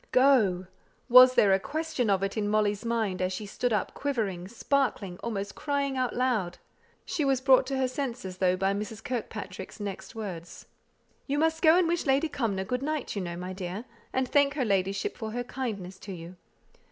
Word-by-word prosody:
Go! 230 -9 +4 0.4
was 255 +1 +9
there 200 -4 +5
a 190 - +4
question 310 -2 -2
of 195 -1 +2
it 195 - -2
in 210 -2 -1
Molly's 210 0 +1
mind, 225 -6 -1
as 185 0 0
she 200 +3 -4
stood 245 +4 -2
up 210 -3 0
quivering, 210 -11 -2
sparkling, 225 -5 -1
almost 200 -4 -3
crying 280 -2 -1
out 255 -1 -1
loud. 230 -9 0 0.5
She 310 - -1
was 270 -2 +2
brought 260 -1 +5
to 270 0 -1
her 260 -1 +2
senses, 245 -8 -4
though, 185 -1 +3
by 195 +1 +1
Mrs. 210 +2 -5
Kirkpatrick's 210 -6 -5
next 205 0 -6
words. 185 -6 -7 0.6
"You 285 +1 0
must 320 +1 +1
go 320 0 +6
and 365 -2 +3
wish 340 -2 -1
Lady 275 +4 +3
Cumnor 220 -9 -1
good 250 +5 -2
night, 300 -3 -2
you 200 - -1
know, 175 -1 -5
my 180 +1 -5
dear, 190 +4 -5 0.3
and 260 0 0
thank 285 +1 +3
her 265 -4 0
ladyship 195 -1 0
for 220 -1 -5
her 245 +1 -2
kindness 205 -8 -5
to 195 - -7
you. 170 +1 -9
220 Hz, 190 wpm, -28 LUFS, 195-265 Hz, 0.6 s, was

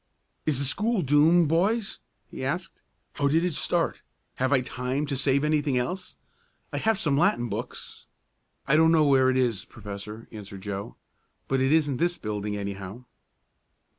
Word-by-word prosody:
"Is 150 -4 +3
the 140 - 0
school 210 - +1
doomed, 155 +4 +5
boys?" 195 +7 +1 0.3
he - - -8
asked. - - -3 0.3
"How 140 - 0
did 160 +5 +2
it 180 - -1
start? - - 0 0.4
Have 130 +1 0
I 130 -3 +4
time 125 +3 -2
to 140 -1 -2
save 135 +1 +2
anything 150 -3 +1
else? 180 +9 -3 0.6
I - - -1
have 220 -1 +2
some 150 -6 +1
Latin 120 -6 +2
books 115 +5 -7 0.3
" - - -42
"I 140 - +4
don't 160 +1 +5
know 160 -2 +5
where 135 -2 +5
it 130 - +1
is, 120 -6 +1
Professor," 105 0 -8
answered 100 -3 -9
Joe. 100 0 -5 0.5
"But 135 -1 +1
it 130 +1 +2
isn't 150 -4 +2
this 175 +3 0
building, 105 -1 -3
anyhow." 100 +3 -6
135 Hz, 165 wpm, -26 LUFS, 115-160 Hz, 0.6 s, doomed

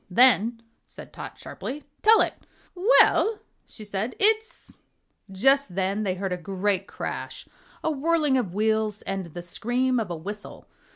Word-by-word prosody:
"Then," 230 +1 +4 0.2
said - - -12
Tot, - - -8
sharply, 290 +3 -7 0.2
"tell 445 +1 +6
it!" - - +1 0.4
"Well," 425 +2 +4 0.3
she 215 - -9
said, 205 +4 -3
"it's 440 +2 +1 0.3
" - - -48 0.3
Just 265 0 +2
then 195 +2 0
they 190 -3 -1
heard 190 0 -3
a - - -2
great 195 +1 -1
crash, - - -6 0.4
a 320 - +1
whirling 305 -1 +1
of 240 -9 0
wheels 215 0 0
and 195 -2 -3
the 175 +2 -8
scream 245 +8 0
of 215 -5 -3
a 170 - -3
whistle. 205 +6 -8
220 Hz, 155 wpm, -25 LUFS, 195-270 Hz, 0.4 s, tell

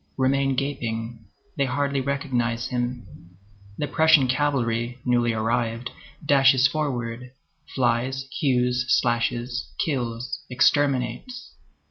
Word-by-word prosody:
remain 135 0 +2
gaping; 115 -4 -4 0.3
they 140 - +2
hardly 140 +1 -1
recognize 125 -4 -1
him. 120 0 -3 0.7
The 150 - -1
Prussian 160 -4 +4
cavalry, 125 -3 0
newly 120 -1 +2
arrived, 115 +2 -1 0.3
dashes 135 -2 +5
forwards, 125 -4 -3 0.5
flies, 130 +1 0
hews, 125 -2 +1
slashes, 120 +1 0
kills, 130 0 -3
exterminates. 140 - 0
125 Hz, 90 wpm, -24 LUFS, 120-140 Hz, 0.7 s, dashes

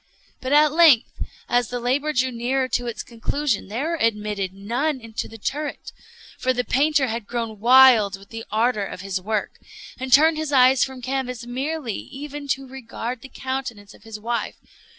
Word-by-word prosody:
But 255 - -4
at 300 0 +5
length, 310 -7 +5 0.4
as 245 -1 +2
the 245 - -3
labor 270 +5 0
drew 260 -2 +1
nearer 255 +3 -1
to 245 -1 -1
its 235 - -4
conclusion, 240 0 -2
there 245 +10 -3
were 335 - -1
admitted 210 -4 0
none 240 +10 -2
into 230 -2 -6
the 225 - -11
turret; 290 +7 -4 0.5
for 255 - +1
the 250 0 -1
painter 290 +2 +2
had 230 -3 -4
grown 230 -3 -4
wild 235 -4 +6
with 195 +1 -17
the 225 0 -7
ardor 220 0 +1
of 185 - -7
his 190 -1 -3
work, 215 +2 -3 0.4
and 260 0 -5
turned 310 +4 +6
his 310 -1 -3
eyes 260 -1 +5
from 260 -2 -6
canvas 250 -2 -3
merely, 265 0 -3
even 285 +1 -8
to 270 0 -1
regard 250 -2 -6
the 265 - -11
countenance 260 -7 -5
of - - -18
his 220 0 -9
wife. 235 +2 -3
250 Hz, 180 wpm, -23 LUFS, 225-270 Hz, 0.5 s, wild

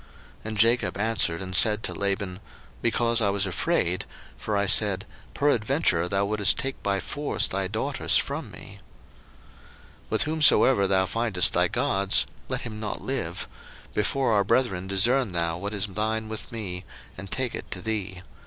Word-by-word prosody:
01:031:031 - - -26
And 110 0 -5
Jacob 115 -3 +2
answered 105 -6 0
and 95 0 -4
said 105 +2 +5
to - - -1
Laban, 100 -2 -3 0.4
Because 115 0 +1
I 100 - +2
was 100 0 0
afraid: 90 -1 -1 0.3
for 105 -1 -3
I 100 - +1
said, 100 0 +3 0.3
Peradventure 130 - +1
thou 100 +1 0
wouldest 105 0 +3
take 135 0 -4
by 100 -1 -1
force 145 +9 -1
thy 95 0 -2
daughters - - +1
from - - -3
me. - - -12 1.3
01:031:032 - - -29
With 110 - +1
whomsoever 145 -8 +4
thou 95 -1 +2
findest 100 -3 +1
thy - - +2
gods, 95 0 +2 0.2
let - - -2
him 110 -3 -7
not 105 -2 -5
live: 90 -11 -3 0.5
before 115 - 0
our 100 -1 +3
brethren 100 -4 0
discern 105 +3 +3
thou 85 0 -1
what 100 +2 -4
is 100 0 0
thine 110 +2 -3
with 110 +3 -5
me, 95 -6 -5 0.3
and 95 +1 -9
take 130 +3 -2
it - - -6
to 90 - -4
thee. 95 -3 -4
105 Hz, 165 wpm, -25 LUFS, 95-115 Hz, 1.3 s, said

